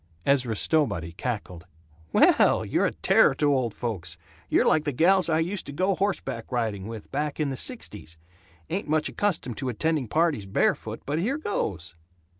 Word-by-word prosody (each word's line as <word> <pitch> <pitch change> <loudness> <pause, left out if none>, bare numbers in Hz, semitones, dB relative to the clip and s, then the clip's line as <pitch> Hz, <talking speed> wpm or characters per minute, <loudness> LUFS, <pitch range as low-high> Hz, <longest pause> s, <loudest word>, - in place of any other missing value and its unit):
Ezra 130 -5 +2
Stowbody 105 - 0
cackled, 90 -4 -5 0.4
"Well, - - +4
you're - - +1
a - - -2
terror - - +3
to 145 -1 +2
old 125 -5 -1
folks. 90 -8 -4 0.3
You're - - +3
like 155 - +3
the 145 - -1
gals 175 +7 +3
I 160 - +3
used 175 +4 -2
to - - -5
go 185 +7 +1
horseback 190 - -2
riding 110 -5 -2
with, 115 -2 -8
back 150 +2 -2
in 150 -2 0
the 135 - -3
sixties. 105 - -3 0.5
Ain't 190 +1 -2
much 155 0 +1
accustomed 170 - -2
to 130 -2 -3
attending 150 +2 -1
parties 155 -7 +1
barefoot, 95 - 0
but 145 +3 -1
here 245 - 0
goes!" 95 - -3
140 Hz, 170 wpm, -26 LUFS, 110-165 Hz, 0.5 s, Well